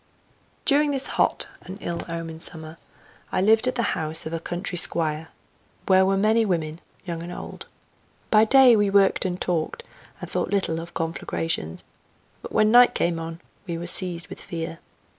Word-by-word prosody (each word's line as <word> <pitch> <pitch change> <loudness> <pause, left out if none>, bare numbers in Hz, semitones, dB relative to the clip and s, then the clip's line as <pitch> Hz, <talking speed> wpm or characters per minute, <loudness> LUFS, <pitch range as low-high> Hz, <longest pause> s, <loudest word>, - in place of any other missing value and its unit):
During 295 +1 +4
this 275 -2 -2 0.2
hot - - +2 0.2
and 185 +2 -9
ill 170 -3 -4
omened 165 -1 -6
summer 160 -1 -4 0.5
I - - 0
lived 220 +5 +4
at 255 - 0
the 235 - 0
house 160 -1 0
of 160 - -5
a 165 - -2
country 175 +3 -4
squire, 160 -2 +1 0.6
where 190 0 +4
were 195 0 +2
many 220 +3 +3
women, 165 -5 -2 0.2
young 170 -2 -4
and 175 +1 -7
old. - - -8 0.6
By 215 0 +6
day 260 0 +7
we 205 -2 +2
worked 195 0 +3
and 180 -1 -2
talked, 175 - -2 0.4
and - - -7
thought - - -2
little 190 -5 0
of 170 +1 -9
conflagrations, 165 - -3 0.6
but - - -9
when 215 0 +3
night 245 +1 +7
came 170 -1 0
on 165 +1 -7 0.3
we 170 -1 -3
were 170 - -6
seized 175 -1 0
with - - -9
fear. 165 -1 -6
175 Hz, 175 wpm, -24 LUFS, 165-205 Hz, 0.6 s, day